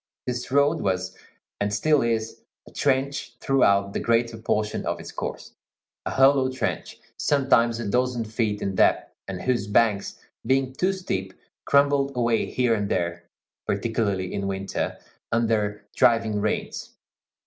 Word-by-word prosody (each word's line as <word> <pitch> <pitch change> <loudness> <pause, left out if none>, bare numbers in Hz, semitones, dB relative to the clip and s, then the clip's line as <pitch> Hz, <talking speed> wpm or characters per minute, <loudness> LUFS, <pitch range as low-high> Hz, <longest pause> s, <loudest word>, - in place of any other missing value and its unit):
This 125 0 -3
road 140 +1 +3
was, 95 -1 -1 0.4
and 100 0 0
still 150 +7 +3
is, 115 -1 -2 0.3
a - - -13
trench 135 -2 -1
throughout 100 -7 +2
the - - -1
greater 115 0 +1
portion 105 -1 -1
of - - -2
its - - -9
course; - - -6 0.5
a - - 0
hollow 135 0 +4
trench, 130 - -3 0.2
sometimes 120 -5 +2
a 120 - -3
dozen 125 +1 0
feet 110 -1 -2
in 100 - -1
depth, 95 - +2
and 95 -2 -5
whose 120 -5 0
banks, 105 -1 +1 0.2
being 130 +2 +1
too 185 +8 +1
steep, 95 - -4 0.3
crumbled 140 -1 +3
away 115 -2 +1
here 125 -2 +1
and 105 -2 -1
there, 85 -1 -2 0.4
particularly 100 -3 -1
in 100 -1 -2
winter, 95 0 -3 0.3
under 110 -3 0
driving 115 -3 +3
rains. 105 - -3
115 Hz, 140 wpm, -25 LUFS, 100-130 Hz, 0.5 s, hollow